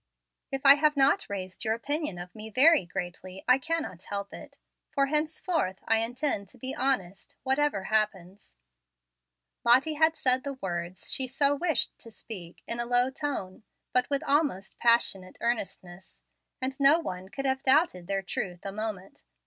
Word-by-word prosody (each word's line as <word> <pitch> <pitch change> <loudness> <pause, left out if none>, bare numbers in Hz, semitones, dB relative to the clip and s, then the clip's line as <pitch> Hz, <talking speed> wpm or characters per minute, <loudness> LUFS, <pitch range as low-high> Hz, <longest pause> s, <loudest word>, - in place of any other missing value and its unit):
If 270 0 -4
I 275 +1 +9
have 300 0 +2
not 270 +1 +3
raised 185 -2 -5
your 220 -1 +1
opinion 290 - -2
of 180 +1 -8
me 220 0 -8
very 280 - +5
greatly, 180 +2 -6
I 255 +1 +5
cannot 320 - -3
help 200 0 -5
it, - - -11 0.3
for 275 - +1
henceforth 305 - -1
I 225 - +4
intend 230 -2 -1
to - - -12
be 260 0 -5
honest, 200 -9 -2
whatever 265 -6 +1
happens." 195 - -2 1.1
Lottie 260 +6 +5
had 315 +1 +3
said 255 0 +2
the 280 -1 -4
words 175 -5 -5
she 260 - 0
so 280 +2 +2
wished 315 -4 0
to 230 - -10
speak 190 -6 -9
in 235 - -2
a 240 - 0
low 245 +1 +3
tone, 265 -11 -4 0.3
but 250 0 +2
with 280 -1 -1
almost 280 - 0
passionate 230 -6 +2
earnestness, 190 -5 -4 0.4
and 265 +1 -3
no 280 +3 +6
one 185 - -6
could 275 +4 -5
have 265 0 0
doubted 265 - +3
their 195 -1 -1
truth 180 -1 -4
a 195 - -3
moment. 210 -2 -5
240 Hz, 165 wpm, -28 LUFS, 190-280 Hz, 1.1 s, I